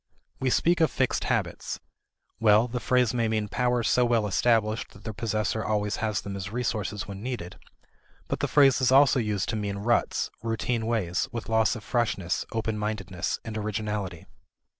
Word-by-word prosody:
We 130 - +1
speak 170 +6 +2
of 160 - +5
fixed 130 -1 0
habits. - - -2 0.6
Well, 110 +1 +5
the 125 +1 -3
phrase 125 -1 +2
may 115 -2 +1
mean 110 -1 0
powers 125 +1 0
so 125 - +3
well 120 -3 +2
established 110 +2 +1
that 100 - -15
their 110 - -5
possessor 110 0 -1
always 105 -1 0
has 110 -3 -1
them 100 -1 -6
as 100 0 -5
resources 105 -4 -2
when 100 0 -7
needed. 115 -7 -5 0.7
But - - -2
the - - 0
phrase 135 -3 +5
is 130 - +3
also 135 0 +6
used 105 -4 -1
to - - -1
mean 100 -2 -2
ruts, 120 +4 0
routine 115 +1 -1
ways, 100 -5 0
with 115 -3 -5
loss 110 +1 +3
of 110 - -8
freshness, 105 -8 -1
open 110 -1 -2
mindedness, 95 -5 -2
and 110 -1 -5
originality. 105 -4 -3
110 Hz, 175 wpm, -27 LUFS, 105-120 Hz, 0.7 s, also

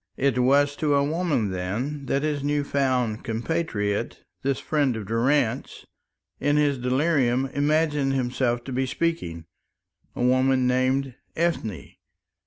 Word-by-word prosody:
It 135 -2 +1
was 140 +3 +3
to 150 -2 +1
a 140 - +3
woman, 150 - 0
then, 120 +11 -3
that 140 +1 0
his 150 -2 -1
new 145 0 +1
found 130 -6 0
compatriot, 115 -4 -2 0.2
this 135 0 0
friend 145 -5 0
of 110 -2 -5
Durrance, 120 +3 0 0.5
in 145 +2 +2
his 145 -3 +2
delirium 130 -1 +1
imagined 145 -1 +1
himself 125 -2 0
to 135 - -7
be 130 +1 0
speaking 125 - -2 0.7
a - - -2
woman 130 +1 +3
named 130 +1 +1 0.2
Ethne. 115 - -2
135 Hz, 130 wpm, -25 LUFS, 120-145 Hz, 0.7 s, was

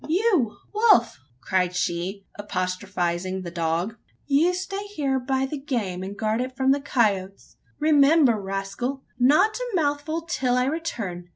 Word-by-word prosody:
"You, 355 - +2 0.2
Wolf!" 425 - +4 0.2
cried 180 -1 0
she, 185 +2 -2
apostrophising 185 -2 -2
the 170 - -6
dog; 170 +6 -1 0.3
"you 295 +5 +3
stay 390 +2 -4
here 285 -10 -1
by 265 +1 0
the 285 +2 -5
game, 220 -10 -3
and 195 +2 -6
guard 220 +2 0
it 255 +1 -5
from 265 0 +3
the 280 +1 +2
coyotes. 200 -7 -1 0.2
Remember! 290 -6 +4
rascal! 195 +8 -4 0.2
not 300 - +4
a - - -4
mouthful 310 +1 -1
till 265 -7 0
I 250 - +2
return. 225 - -4
250 Hz, 145 wpm, -24 LUFS, 190-295 Hz, 0.3 s, Wolf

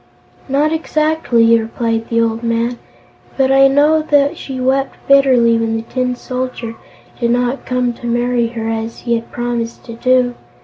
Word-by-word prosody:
"Not 295 +3 +1
exactly," 305 -8 +2
replied 225 0 -2
the 230 0 +2
old 225 0 -1
man, 235 +1 -1 0.6
"but 265 -1 +2
I 270 0 +6
know 295 +3 +3
that 290 -2 +2
she 265 -2 -7
wept 265 +1 0
bitterly 255 -4 +4
when 225 0 -1
the 225 - -3
Tin 250 +1 -2
Soldier 250 -2 -5 0.5
did 235 -1 0
not 245 +2 -1
come 250 -1 0
to 240 0 -8
marry 240 0 +1
her, 230 -1 -5
as 225 0 -4
he 235 - -1
had 230 0 -3
promised 240 -1 -4
to 230 - -9
do. 250 +1 +2
245 Hz, 165 wpm, -16 LUFS, 230-270 Hz, 0.6 s, I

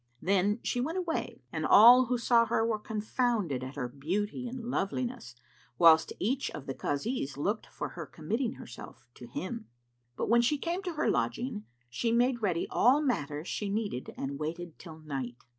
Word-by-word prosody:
Then 200 - +2
she 245 - 0
went 320 +8 -2
away 345 -3 -3
and - - -2
all 245 +4 +8
who 250 +1 +1
saw 235 -1 +4
her 225 0 +1
were 225 -2 0
confounded 215 - -1
at 130 +2 -7
her 125 -4 -2
beauty 190 - -3
and 245 -1 -6
loveliness, 235 - -3 0.4
whilst 160 0 +6
each 260 +7 -1
of 150 -3 -8
the 135 - -3
Kazis 145 - -2
looked 205 +9 -1
for - - -5
her 170 -3 -7
committing 225 - -2
herself 120 - -11
to 120 - -11
him. 215 - -5 0.5
But, - - -2
when 235 +2 +5
she 260 +5 +2
came 340 +5 -2
to 360 -3 -4
her 305 - 0
lodging, 235 -4 -2 0.2
she 230 - -1
made 240 +1 +2
ready 180 -5 0
all 255 +5 +5
matters 155 - -2
she 205 - -3
needed 205 - -3
and 140 +1 -4
waited 165 +2 -5
till 160 -3 -10
night. 135 -6 -5
210 Hz, 175 wpm, -30 LUFS, 155-245 Hz, 0.5 s, all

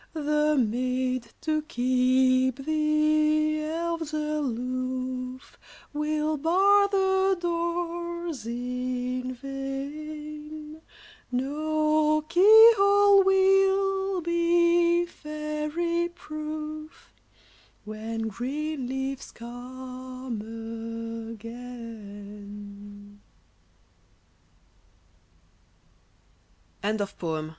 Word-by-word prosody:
The 300 0 +2
maids, 255 0 0
to 310 -1 0
keep 255 0 +2
the 305 0 +2
elves 330 0 -3
aloof, 255 -3 -3 0.3
Will 305 +1 0
bar 390 +6 +4
the 385 -1 +2
doors 340 -4 -3
in 250 +1 -3
vain; 300 +3 -6 0.5
No 305 +3 +1
key 435 +7 +8
hole 400 0 +6
will 385 0 +3
be 340 0 +3
fairy 305 +2 -2
proof, 310 -1 -7 0.7
When 220 +1 -4
green 270 +5 -3
leaves 265 +1 -4
come 255 0 -7 1.0
again. 205 -3 -10
300 Hz, 55 wpm, -27 LUFS, 255-335 Hz, 1.0 s, key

